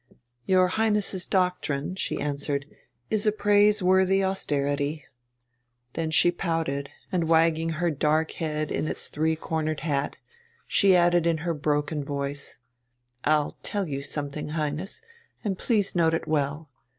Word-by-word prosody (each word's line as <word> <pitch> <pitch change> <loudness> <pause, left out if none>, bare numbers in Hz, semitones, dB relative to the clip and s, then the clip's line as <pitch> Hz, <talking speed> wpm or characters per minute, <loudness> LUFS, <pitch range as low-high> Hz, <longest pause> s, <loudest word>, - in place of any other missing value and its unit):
"Your 185 -1 +5
Highness's 210 -2 0
doctrine," 180 -5 0
she 190 - -3
answered, 140 -1 -2 0.5
"is 215 0 +1
a - - +5
praiseworthy 200 -2 +3
austerity." 145 -5 -1 0.9
Then 160 -1 -2
she 175 +2 +4
pouted, 160 -6 -2 0.2
and, 170 -3 0
wagging 165 0 +3
her 170 +2 0
dark 155 +2 +1
head 155 -2 -3
in - - -1
its - - -4
three 160 +1 0
cornered 155 -1 -2
hat, 145 -3 -1 0.5
she 195 -2 +4
added 175 -1 +4
in 165 -1 +2
her 170 - +1
broken 150 0 -1
voice: 140 0 -4 0.7
"I'll 150 -1 +2
tell 200 -3 -2
you 140 -2 -3
something, 145 +1 -5
Highness, 155 - -3 0.4
and 205 -4 -1
please 210 -5 +1
note 165 -2 +3
it - - -4
well. 150 0 -1
160 Hz, 135 wpm, -26 LUFS, 145-185 Hz, 0.9 s, Your